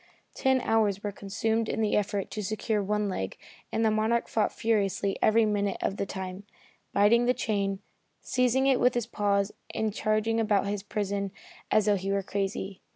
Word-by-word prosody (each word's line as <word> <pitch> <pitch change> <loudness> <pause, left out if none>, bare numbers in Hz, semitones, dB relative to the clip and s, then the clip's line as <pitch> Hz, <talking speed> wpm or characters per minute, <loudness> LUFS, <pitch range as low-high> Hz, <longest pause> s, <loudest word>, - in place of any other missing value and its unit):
Ten 265 -1 +2
hours 210 -4 +1
were 205 - -2
consumed 220 +3 -1
in - - -2
the 215 -1 +2
effort 200 -1 -1
to 215 - -3
secure 215 +1 -1
one 210 +1 0
leg 95 - -3 0.3
and 225 - +1
the 220 - +4
Monarch 220 +2 +1
fought 220 - +1
furiously 200 -3 0
every 225 +1 +4
minute 205 -2 0
of 195 - -2
the 200 - -2
time, 190 0 -5 0.5
biting 225 +4 +4
the 250 - +3
chain, 200 -2 -1 0.4
seizing 255 +1 +1
it 270 -2 +4
with 250 0 +3
his 240 -2 0
paws 200 -3 0 0.2
and 220 -2 0
charging 215 +2 +1
about 210 -3 +2
in 200 - -2
his 205 -1 -2
prison 200 -1 -2 0.4
as 215 - +3
though 205 -1 +3
he 195 +1 -3
were 200 0 0
crazy. 195 0 -3
210 Hz, 185 wpm, -28 LUFS, 200-225 Hz, 0.5 s, the